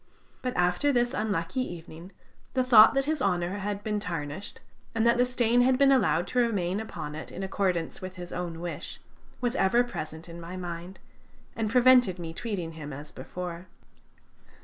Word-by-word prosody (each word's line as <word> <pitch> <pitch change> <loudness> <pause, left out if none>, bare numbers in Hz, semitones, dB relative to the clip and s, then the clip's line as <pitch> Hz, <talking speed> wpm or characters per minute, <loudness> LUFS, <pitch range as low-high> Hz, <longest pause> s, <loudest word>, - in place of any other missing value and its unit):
But 250 -1 -3
after 180 +11 +2
this 240 -1 +1
unlucky 205 0 -1
evening, 170 -3 -8 0.4
the 255 - +3
thought 235 -1 +8
that 275 0 +2
his 310 -1 -1
honor 180 -2 0
had 205 0 -3
been 210 0 -1
tarnished, 170 -1 -5 0.4
and 225 0 +2
that 235 +1 +4
the 250 - +5
stain 245 -1 +3
had 255 +1 +4
been 275 0 +5
allowed 190 - +3
to 250 - +1
remain 200 -5 +1
upon 185 -9 -6
it 155 - -7
in 190 - -6
accordance 185 -4 -1
with 185 0 -7
his 175 -1 -8
own 170 -2 -4
wish, 175 0 -6 0.4
was 245 0 0
ever 235 +4 +3
present 160 -9 -6
in 170 0 -9
my 175 +2 -7
mind, 175 +1 -6 0.6
and 220 -2 -1
prevented 250 -5 +5
me 165 -2 -6
treating 180 -4 -4
him 155 -2 -8
as 145 +2 -8
before. 180 0 -7
190 Hz, 175 wpm, -28 LUFS, 170-240 Hz, 0.6 s, thought